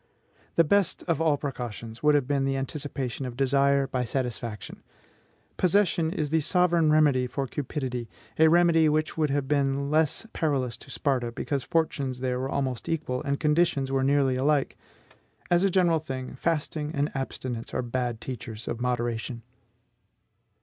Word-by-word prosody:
The 165 - +6
best 200 +4 +2
of 165 -3 0
all 155 -3 +3
precautions 120 -5 -6
would 150 0 +4
have 140 -3 +1
been 140 -1 +1
the 135 0 0
anticipation 135 -2 -4
of 120 -1 -8
desire 140 +1 +3
by 130 -2 -2
satisfaction. 120 -3 -4 0.8
Possession 175 -3 +2
is 150 -3 -2
the 160 - +3
sovereign 170 0 +3
remedy 145 -5 +4
for 135 +2 -3
cupidity, 130 -3 -4 0.3
a 160 - +7
remedy 165 -1 +5
which 155 +1 0
would 155 -2 +1
have 140 -1 -1
been 140 -1 +2
the 140 - -2
less 155 +6 +1
perilous 135 -7 0
to - - -15
Sparta 130 -4 -1
because 135 +3 -3
fortunes 140 -5 -1
there 125 -1 -1
were 130 +1 -2
almost 130 -4 -2
equal, 150 -6 -2
and 140 -2 -2
conditions 150 -3 +2
were 135 -1 +1
nearly 135 -1 +3
alike. 140 +1 +1 0.8
As 175 +1 +4
a 195 - +4
general 175 -3 +3
thing, 130 -4 -6
fasting 155 0 -1
and 145 +1 0
abstinence 130 -3 -4
are - - -2
bad 120 -1 -2
teachers 120 -3 -7
of 120 - -3
moderation. 120 -1 -2
140 Hz, 160 wpm, -27 LUFS, 125-155 Hz, 0.8 s, a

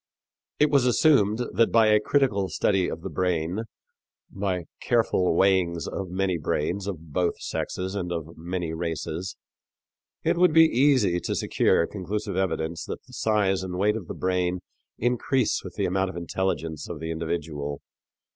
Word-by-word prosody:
It 150 0 +3
was 135 -3 +4
assumed 120 -5 +4
that 115 - +3
by 115 -1 +5
a 105 0 +5
critical 105 -5 +1
study 95 +2 +1
of 80 - -6
the - - -5
brain, 90 +3 -1 0.7
by 95 -3 -2 0.2
careful 105 -7 +2
weighings 90 -3 +2
of 95 -2 -4
many 95 -1 0
brains 85 +6 -1
of 80 -6 -6
both 90 0 0
sexes 95 +1 -3
and 90 -3 -3
of 85 -1 -5
many 85 0 -4
races, 85 +2 -4 0.9
it - - +1
would 180 -3 +5
be 160 0 +8
easy 125 - +3
to - - -3
secure 85 - +2
conclusive 105 +1 -4
evidence 85 -4 -1
that - - -6
the - - -18
size 100 -4 +1
and 90 -1 -4
weight 105 +3 +2
of 105 -7 -6
the - - -6
brain 90 -1 0 0.4
increase 125 +1 +1
with - - -9
the - - 0
amount 95 +1 0
of 95 - -7
intelligence 85 -3 -3
of 85 - -5
the 80 +1 -4
individual. 80 -3 -4
95 Hz, 160 wpm, -26 LUFS, 85-105 Hz, 0.9 s, be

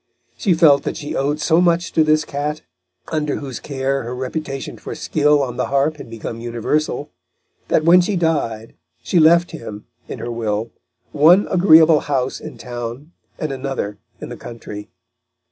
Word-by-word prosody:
She 185 -5 +1
felt 150 -4 +5
that - - -4
she 145 - -5
owed 145 +2 0
so 165 +2 +3
much 175 0 +2
to 160 - +3
this 155 0 +2
cat, 150 +1 -4 0.5
under 150 -2 -1
whose 135 -4 -6
care 135 -1 -2
her 120 +2 -5
reputation 135 +1 -5
for - - -7
skill 150 -1 +2
on 125 -2 -5
the - - -1
harp 140 +3 +1
had - - -10
become 115 0 -6
universal, 125 +5 -2 0.6
that 155 - +2
when 175 +2 +7
she 195 +3 -1
died 145 -10 -1 0.3
she 175 - +2
left 170 +2 +5
him, 105 -2 -8 0.2
in - - -6
her 120 - -5
will, 110 -1 -2 0.4
one 165 +7 +5
agreeable 160 -4 +6
house 135 -3 -2
in - - -9
town 120 +4 -7 0.3
and 155 - -3
another 130 -7 -4 0.2
in - - -7
the - - -7
country. 105 -3 -9
145 Hz, 165 wpm, -20 LUFS, 120-160 Hz, 0.6 s, when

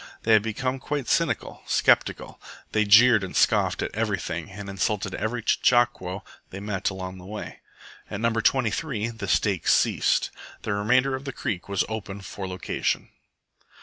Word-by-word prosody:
They 110 - +4
had 110 - +6
become 130 +5 -2
quite 145 -2 -3
cynical, - - 0
sceptical. - - +1 0.3
They 110 -1 +2
jeered 110 +1 +7
and 95 - -6
scoffed - - +2
at - - -4
everything, - - -2
and 100 +1 -8
insulted 100 +1 -1
every 115 +1 -3
chechaquo 120 -7 +2 0.3
they 95 - -7
met 100 -2 -2
along 95 -1 -6
the 90 - -12
way. 105 +1 -7 0.5
At 105 - -4
No. 115 +1 +2
23 115 +1 0
the 115 -4 -6
stakes 95 -2 +2
ceased. - - +2 0.3
The 110 - -1
remainder 125 +6 +2
of 130 +1 -4
the 135 - -3
creek 100 -6 -4
was 100 -3 +1
open 100 -2 -6
for 95 0 -6
location. 95 0 -2
105 Hz, 155 wpm, -25 LUFS, 95-120 Hz, 0.5 s, jeered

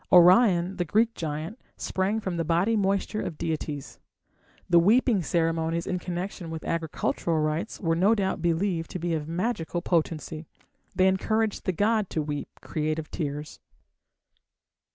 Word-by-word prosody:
Orion, 180 0 +6
the 175 - +1
Greek 220 +7 +2
giant, 160 - -4 0.2
sprang 195 +4 -1
from 190 -5 -3
the 165 - 0
body 175 +8 +2
moisture 200 +1 0
of 155 - -5
deities. 150 -3 -4 0.7
The 170 -1 +6
weeping 215 +3 +4
ceremonies 165 0 0
in 180 - -2
connection 180 0 -5
with 160 -1 -6
agricultural 165 0 -1
rites 155 +7 -2
were 165 -3 +1
no 195 +7 +4
doubt 190 -4 -1
believed 170 0 0
to 185 - -5
be 170 0 -1
of 155 -2 -2
magical 175 -1 -2
potency; 160 -2 -1 0.5
they 185 0 +4
encouraged 215 +3 0
the 185 - +2
god 210 +2 +1
to 155 - -1
weep 145 -1 -4
creative 155 0 -3
tears. 150 -1 -4
175 Hz, 145 wpm, -27 LUFS, 160-195 Hz, 0.7 s, Orion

